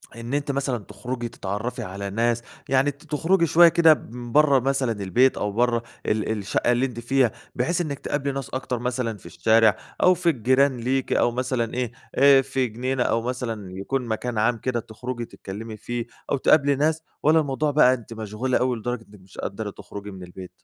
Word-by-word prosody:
إن 115 +3 -6
أنتِ 145 0 0
مثلًا 135 -2 -1
تخرجي 120 +5 -5
تتعرفي 110 +6 -4
على 100 +1 -5
ناس؟ 115 +3 +1 0.3
يعني 135 +2 +3
ت 145 +3 -20
تخرجي 165 +4 +2
شوية 170 +2 +7
كده 165 -1 +6
من 120 -3 -8
برّه 145 -2 +5
مثلًا 135 -1 0
البيت 110 +5 +2
أو 105 0 -1
برّه 120 +1 +1 0.2
ال 110 0 0
الشقة 105 +3 0
اللي 125 +2 +2
أنتِ 120 -3 -5
فيها، 125 -1 +2 0.2
بحيث 170 +8 0
إنِّك 145 -4 -4
تقابلي 140 -1 -2
ناس 135 -1 -5
أكتر 130 -2 -3
مثلًا 120 -3 -2
في - - -21
الشارع 110 +6 +3 0.3
أو 185 - +7
في 175 -1 +1
الجيران 130 0 +2
ليكِ 130 +3 -1
أو 120 - +3
مثلًا 125 -2 -2
إيه، 125 -2 -2 0.2
آآ، 140 -1 +7
في 135 -1 -1
جنينة 125 +3 -1
أو 115 -1 +1
مثلًا 115 -6 -4
يكون 125 +5 -2
مكان 115 +1 -3
عام 115 +2 +2
كده 120 0 -2
تُخرجي 120 +2 -6
تتكلمي 110 +2 -8
فيه 120 +1 -4 0.3
أو 140 - +3
تقابلي 140 +1 +4
ناس، 155 +3 +1 0.2
والّا 160 +2 +5
الموضوع 145 0 0
بقى 130 -3 +5
أنتِ 115 -2 -7
مشغولة 110 +4 -1
أوي 125 -1 0
لدرجة 120 0 -4
إنك 105 - -15
مش 95 - -18
قادرة 105 +2 -4
تخرجي 100 +1 -9
من 95 -1 -9
البيت؟ 90 +1 -10
125 Hz, 190 wpm, -24 LUFS, 110-135 Hz, 0.3 s, شوية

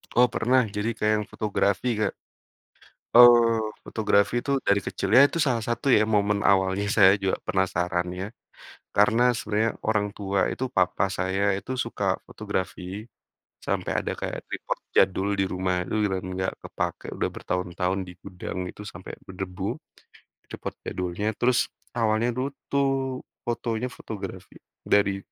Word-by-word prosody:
Oh, 125 +1 +6
pernah. 125 0 +2
Jadi 105 +3 -2
kayak 105 -1 +1
yang - - -15
fotografi, 105 +2 0
Kak. 110 - 0 1.0
Oh, 115 -3 +7
fotografi 105 +2 +2
itu 140 - -3 0.2
dari 100 0 +4
kecil, - - -3
ya 135 - +10
itu - - -9
salah 120 -3 +2
satu 120 +4 0
ya 105 - +4
momen 100 0 +2
awalnya 95 +1 +2
saya 95 -2 +8
juga 95 -1 0
penasaran 90 -2 0
ya 95 - -2 0.7
karena 105 +4 +4
sebenarnya 110 0 0 0.2
orang 105 -2 +2
tua 100 -1 -1
itu 130 - -3
papa 95 +2 +2
saya 95 +1 0 0.2
itu 130 - -11
suka 115 -3 -4 0.2
fotografi 100 -3 -4 0.8
sampai - - -1
ada - - -2
kayak - - -3
tripod - - -3 0.2
jadul 95 +1 +3
di 95 - +3
rumah. 95 0 0
Dulu 110 - -1
di 105 - +2
dan 95 - -4
nggak 95 0 -1
kepakai, - - -4
udah - - -1
bertahun-tahun 90 +1 -2
di - - -8
gudang 90 0 -6
itu 105 - -11
sampai 90 +2 -9
berdebu, 95 -1 -4 0.7
tripod - - -6
jadulnya. 90 +3 -3
Terus 125 0 +3 0.4
awalnya 110 +1 +2
dulu 130 - 0 0.3
tuh 140 0 +2 0.6
fotonya 120 0 -2
fotografi 95 -3 -8 0.4
dari, 100 -1 +4
105 Hz, 145 wpm, -26 LUFS, 95-115 Hz, 1.0 s, ya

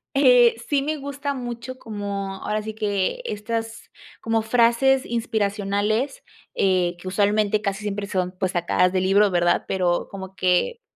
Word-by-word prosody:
eh, 250 -3 +6
sí, 285 -2 +1
me 305 +3 -2
gusta 280 0 -4
mucho 245 0 -6
como 200 -4 -5
ahora 215 0 -2
sí 220 0 -5
que, 205 - -1
estas, 225 - -4 0.3
como 225 0 0
frases 240 +4 +3
inspiracionales, 215 - -1 0.3
eh, 180 -2 +1
que 185 - -10
usualmente, 205 +2 +1
casi 200 -1 -2
siempre, 205 -1 -3
son 185 -2 -2
pues 185 -1 -1
sacadas 180 +1 +2
de 185 0 0
libro, 200 +2 +4
¿verdad? 175 -1 +1
Pero 180 -2 0
como 190 -1 -8
que, 185 - +1
210 Hz, 150 wpm, -23 LUFS, 195-235 Hz, 0.3 s, eh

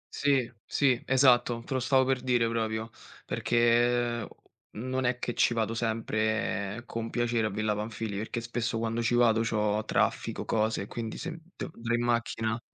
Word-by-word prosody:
Sì, 140 -4 +2 0.2
sì, 135 -4 +2
esatto. 125 -3 +4
Te - - -4
lo 130 - +1
stavo 130 +1 +3
per 130 -1 +1
dire 120 -2 +2
proprio, 110 -1 -2 0.3
perché 120 -1 +2 0.5
non 130 +3 -2
è 125 0 +1
che 120 - -3
ci 120 - +2
vado 110 0 0
sempre 110 -1 -1
con 115 -1 -4
piacere 120 -2 0
a - - -2
Villa 105 +1 -1
Panfili, 105 -1 -4
perché 110 +3 -3
spesso 115 0 -2
quando 115 +1 -1
ci 120 +1 +1
vado 115 -2 +4
c'ho 105 -1 0
traffico, - - 0
cose 110 -2 0
e - - -6
quindi 115 -2 -5
se 170 +3 -4 0.2
de - - -5
dr 115 0 -3
in 120 - 0
macchina. 115 -1 0
115 Hz, 170 wpm, -29 LUFS, 110-120 Hz, 0.5 s, esatto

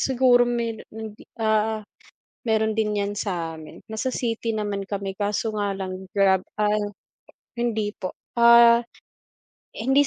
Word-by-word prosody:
Siguro 250 -2 +4
meron 235 -2 -2
hindi, 220 -1 -9
ah, 220 -1 +1 0.6
meron 220 0 +2
din 210 -2 +1
yan 200 0 -2
sa 170 -5 -2
amin. 155 -1 -12
Nasa 250 +4 -2
city 230 -1 -2
naman 205 -2 -2
kami 195 -1 -4
kaso 205 +2 0
nga 200 -1 0
lang 190 0 -5
Grab, 190 -2 +3
ah, 210 0 +1 0.7
hindi 220 -3 -1
po, 185 - -6 0.2
ah, 235 0 +8 0.9
hindi 270 +5 +3
215 Hz, 130 wpm, -24 LUFS, 200-235 Hz, 0.9 s, ah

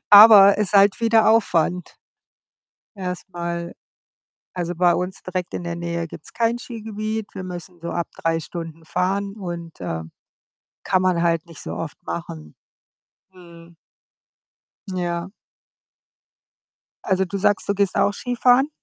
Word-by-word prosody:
Aber 205 -1 +10
ist 210 -3 0
halt 200 +2 +5
wieder 225 -1 +4
Aufwand 180 -5 +1 1.0
erst 180 -1 -5
mal. 170 0 -4 0.8
Also, 175 -1 -2
bei 175 0 +4
uns 180 +1 -3
direkt 185 -1 -4
in 175 - -5
der 170 - -3
Nähe 170 0 -3
gibt's 160 -1 -12
kein 230 0 0
Skigebiet. 220 -2 -5
Wir 190 - -5
müssen 180 -1 -8
so 170 - -5
ab 170 -1 -2
3 165 0 0
Stunden 165 0 -8
fahren, 195 +4 -1
und, 175 - -7
äh, 80 -2 -4 0.8
kann 185 0 +2
man 180 -2 +2
halt 165 -1 +1
nicht 165 -2 -12
so - - -6
oft 160 -3 -6
machen. 80 - -7 0.8
Mhm. 170 -2 -16 1.1
Ja. 175 -1 -3 1.7
Also 190 -1 +1
du 195 +2 -4
sagst, 205 +1 +1
du 200 - +2
gehst 200 -1 +1
auch 205 - +3
Skifahren? 245 +4 +2
180 Hz, 135 wpm, -22 LUFS, 170-200 Hz, 1.7 s, Aber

